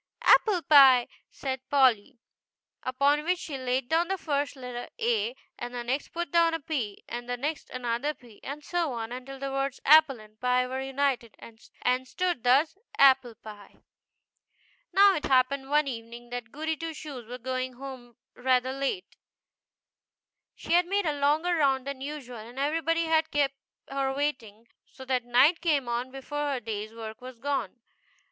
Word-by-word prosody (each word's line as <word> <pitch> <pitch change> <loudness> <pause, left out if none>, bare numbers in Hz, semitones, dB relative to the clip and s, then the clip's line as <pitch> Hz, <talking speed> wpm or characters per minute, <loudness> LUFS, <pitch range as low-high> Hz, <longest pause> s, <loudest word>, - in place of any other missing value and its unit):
" - - -56
Apple 380 -6 +5
pie," 265 -5 +7 0.2
said 265 -2 -4
Polly; 260 -3 +3 0.6
upon 280 +3 +1
which 360 +3 +1
she 315 -5 -6
laid 255 -1 -1
down 330 +4 +2
the 385 +1 -1
first 290 -4 -2
letter, 250 -2 -7
A, 230 0 0 0.2
and 245 +1 -6
the 240 - -3
next 260 +4 -2
put 345 -3 -5
down 335 -1 +4
a - - -3
P, 270 -9 -4
and 240 +1 -6
the 245 - -1
next 295 +5 -4
another 255 +4 -2
P, 235 -4 -18
and 290 +2 -6
so 340 -5 -1
on 225 -1 -5
until 255 +2 -7
the 275 0 -4
words 275 0 -2
Apple 300 -4 +6
and 215 0 -17
Pie 250 0 +2
were 260 +1 -4
united, 270 -4 -1
and 250 +3 -4
stood 355 -5 -2
thus: 275 +8 +3 0.2
APPLE 265 -4 +5
PIE. 210 -2 -12 1.2
Now 395 +2 +6
it 305 -4 -2
happened 270 +1 +2
one 295 0 +3
evening 235 -1 -7
that 245 -2 -6
Goody 315 +2 -2
Two 325 0 -6
Shoes 270 -8 -8
was 250 +1 -8
going 255 0 -2
home 250 -2 -10 0.2
rather 255 0 +1
late. 275 +8 -3 1.4
She - - -3
had 350 0 +4
made 400 +1 0
a 305 - +1
longer 305 +5 +2
round 270 -4 +2
than 280 -1 -5
usual, 275 -4 -6
and 230 +4 -11
everybody 325 +4 +1
had 320 0 +2
kept 285 -2 +1 0.3
her 275 -1 -1
waiting, 235 -6 -3 0.2
so 265 - -12
that 255 -2 0
night 260 +8 +4
came 295 -7 +1
on 240 +2 -2
before 285 +2 -3
her 260 - -2
day's 215 -2 -5
work 225 0 -8
was 255 -1 -10
done. 255 -5 -3
265 Hz, 170 wpm, -28 LUFS, 245-295 Hz, 1.4 s, pie